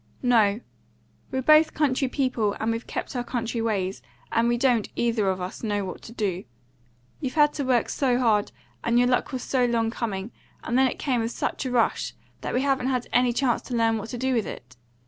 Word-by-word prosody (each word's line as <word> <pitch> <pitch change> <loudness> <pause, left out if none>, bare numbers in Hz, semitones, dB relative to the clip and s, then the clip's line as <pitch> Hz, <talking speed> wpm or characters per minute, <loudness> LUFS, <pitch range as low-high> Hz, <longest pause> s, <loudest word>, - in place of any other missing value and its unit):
"No; 225 -3 +3 0.7
we're 260 0 -2
both 310 +2 +5
country 275 -3 +1
people, 250 -6 0
and 220 +1 0
we've 230 +1 -4
kept - - -5
our 245 - -1
country 235 -1 -3
ways, 195 - -1 0.3
and 230 +1 +2
we 240 0 +2
don't, 245 -4 +2
either 230 -4 +1
of 190 0 -1
us, 180 +1 -6
know 205 -3 -1
what 185 - -7
to - - -11
do. 195 -6 -2 0.8
You've 265 -1 -4
had 295 -1 +5
to 285 - -2
work 255 -3 +2
so 255 -3 +1
hard, 220 -5 +2 0.3
and 235 - +2
your 245 0 +4
luck 250 +3 +1
was 255 -2 -4
so 260 -2 +1
long 230 -2 +1
coming, 215 -2 -4 0.3
and 240 - -2
then 265 +1 +5
it - - -4
came 255 -4 0
with 225 - -1
such 260 - -3
a - - -3
rush, 240 -2 +1 0.3
that - - -3
we 255 - +2
haven't 270 -2 +1
had 255 -2 -1
any 245 0 +4
chance 245 0 +1
to 250 - -5
learn 225 -1 +2
what 220 +2 -7
to 245 - -5
do 260 +2 0
with 225 -5 0
it. 125 +1 -9
240 Hz, 220 wpm, -25 LUFS, 220-255 Hz, 0.8 s, both